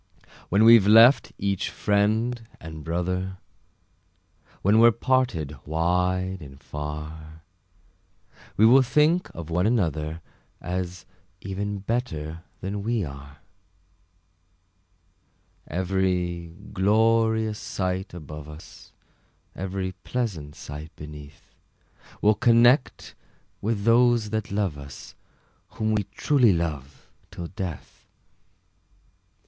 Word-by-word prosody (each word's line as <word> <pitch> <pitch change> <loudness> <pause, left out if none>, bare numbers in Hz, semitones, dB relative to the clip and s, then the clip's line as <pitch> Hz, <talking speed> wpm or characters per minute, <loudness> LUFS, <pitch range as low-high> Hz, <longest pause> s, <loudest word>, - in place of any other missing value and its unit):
When 100 +4 +4
we've 115 -3 +8
left 115 +5 +7
each 100 -1 -1
friend 110 +4 +1 0.2
and 80 -1 -9
brother, 90 +3 -2 1.3
When 105 +3 +4
we're 115 +1 +8
parted 115 - 0
wide 90 +4 0
and 70 -2 -11
far, 75 +1 -7 1.1
We 110 - +6
will 130 +4 +7
think 150 +7 +2
of 85 -1 -7
one 90 +4 +2
another, 80 - -1 0.4
As 90 0 -4 0.4
even 100 +1 -4
better 85 -9 -3 0.2
than 100 +2 -4
we 115 0 -1
are. 70 +1 -11 2.3
Every 90 -2 -1 0.2
glorious 110 +2 +2
sight 95 +1 -3
above 75 -2 -9
us, 75 +1 -13 0.6
Every 95 0 -3
pleasant 90 -13 -3
sight 75 +2 -8
beneath, 75 -1 -12 0.7
We'll 105 +1 +6
connect 120 +4 +3 0.5
with 105 -1 -1
those 115 -1 +3
that 110 -2 -2
love 100 -7 -1
us, 70 0 -11 0.6
Whom 110 0 0
we 105 -2 0
truly 120 +2 +3
love 75 -5 -4 0.2
till 90 -2 -7
death! 90 -4 -7
95 Hz, 95 wpm, -25 LUFS, 80-110 Hz, 2.3 s, we've